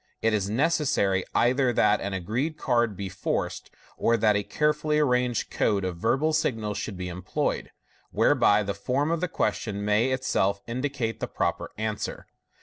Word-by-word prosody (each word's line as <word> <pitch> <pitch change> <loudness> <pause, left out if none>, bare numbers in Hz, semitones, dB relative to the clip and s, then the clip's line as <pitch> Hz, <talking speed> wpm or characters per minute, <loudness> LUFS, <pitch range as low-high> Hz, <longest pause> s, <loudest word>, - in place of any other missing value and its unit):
it 115 0 +3
is 100 -2 0
necessary 120 - +1
either 125 +1 +3
that 105 -2 +3
an 100 - -3
agreed 115 - -2
card 120 -8 +1
be 100 - -4
forced, 95 - -3 0.3
or 115 0 +2
that 105 -1 +3
a 105 - +2
carefully 150 +5 0
arranged 125 -5 +1
code 100 -3 +1
of 90 -2 -3
verbal 135 - +1
signals 110 -8 -1
should 105 -2 -5
be 90 0 -4
employed, 90 +1 -2 0.4
whereby 105 +1 +3
the 100 0 -2
form 135 - -1
of 170 0 0
the 180 - +1
question 105 - -2
may 105 +4 +3
itself 125 -6 0
indicate 120 -2 -3
the - - -2
proper - - -2
answer. 110 0 -3
115 Hz, 160 wpm, -26 LUFS, 100-130 Hz, 0.4 s, it